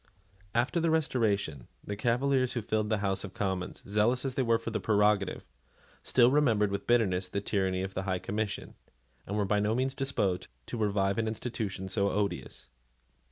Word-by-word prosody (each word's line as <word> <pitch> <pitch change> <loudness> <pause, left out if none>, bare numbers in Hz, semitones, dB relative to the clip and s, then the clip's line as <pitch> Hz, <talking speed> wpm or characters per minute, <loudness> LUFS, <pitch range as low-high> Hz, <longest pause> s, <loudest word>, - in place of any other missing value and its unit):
After 120 +8 +2
the 165 0 +2
Restoration, 110 - 0 0.2
the 105 - -4
Cavaliers 130 +4 +1
who 120 - -2
filled 110 0 0
the 110 - +2
House 95 -1 0
of 95 -2 -8
Commons, 95 -2 -3
zealous 110 +6 +2
as 135 - -1
they 135 - 0
were 115 -2 +3
for 115 0 -5
the 110 - -1
prerogative, 105 -1 +2 0.6
still 120 0 +4
remembered 115 -8 +3
with 100 - -4
bitterness 95 -6 +2
the 100 - -1
tyranny 95 -2 0
of 95 0 -5
the 95 - -2
High 95 - +1
Commission, 105 +2 -3 0.5
and 100 - -2
were 105 - +1
by 105 +1 +2
no 105 +2 +1
means 130 +2 0
disposed 105 -10 -1 0.2
to 120 - -5
revive 100 -2 +1
an 110 - 0
institution 110 -4 -3
so 100 +1 +1
odious. 100 0 -3
105 Hz, 180 wpm, -30 LUFS, 100-120 Hz, 0.6 s, still